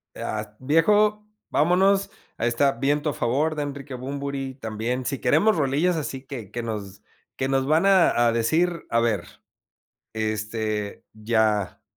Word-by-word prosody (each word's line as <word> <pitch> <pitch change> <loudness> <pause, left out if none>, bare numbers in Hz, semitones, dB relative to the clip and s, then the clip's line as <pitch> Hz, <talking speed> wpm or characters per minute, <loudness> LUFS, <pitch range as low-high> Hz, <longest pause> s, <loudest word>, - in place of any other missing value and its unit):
Ah, 105 0 -5
viejo, 210 +9 +3 0.3
vámonos, 190 +5 +3 0.3
ahí 115 - 0
está, 135 +4 +3
viento 145 +4 0
a - - -7
favor, 145 +7 0
de 150 - -2
Enrique 140 -1 -6
Bunbury, 135 +1 -4
también 120 +1 -3
si 135 +2 -2
queremos 215 0 +3
rolillas 155 +4 +1
así 135 -3 -5
que 120 -8 -7
que 120 +1 -4
nos 100 -4 -6 0.3
que 130 - -1
nos 135 0 +1
van 160 +5 +3
a 175 -11 +4
a - - +3
decir, 165 +9 +1
a 115 - +2
ver, 110 -6 +1 0.9
este, 110 -1 -3
ya 110 -2 0
135 Hz, 145 wpm, -24 LUFS, 110-150 Hz, 0.9 s, a